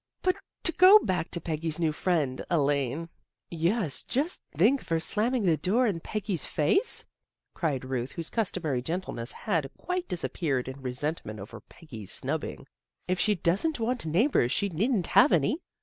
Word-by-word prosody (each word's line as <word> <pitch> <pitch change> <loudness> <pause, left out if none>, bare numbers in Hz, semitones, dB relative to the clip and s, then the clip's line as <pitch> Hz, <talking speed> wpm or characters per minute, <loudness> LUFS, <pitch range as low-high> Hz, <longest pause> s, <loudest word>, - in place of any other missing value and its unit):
" - - -59
But 370 +1 +2 0.3
to 335 - +4
go 370 +5 +8
back 180 - -1
to 170 - -2
Peggy's 160 -1 -3
new 160 -2 +2
friend 150 -5 -1
Elaine 145 0 0
" - - -55
" - - -61
Yes, 170 - +2
just 295 +8 -2
to - - -20
think 235 - +4
of - - -16
her 165 -1 +2
slamming 225 +8 0
the 170 -4 +3
door 210 - +2
in 195 -7 0
Peggy's 200 -2 -2
face," 155 - +1 0.5
cried 140 -6 -2
Ruth, 130 0 -3
whose 165 -2 -6
customary 180 - -1
gentleness 145 -6 -4
had 165 -10 -2
quite 360 0 -3
disappeared 150 -7 -2
in 130 +1 -7
resent 135 +5 -3
ment 105 0 -8
over 100 - -9
Peggy's 115 - -9
snubbing. - - 0 0.2
" - - -45
If 185 +1 0
she 210 -1 +2
doesn't 200 - 0
want 230 -5 -1
neighbors 170 - +2
she 200 - +1
needn't 195 +3 0
have - - +5
any. 175 - +2
170 Hz, 180 wpm, -28 LUFS, 145-215 Hz, 0.5 s, go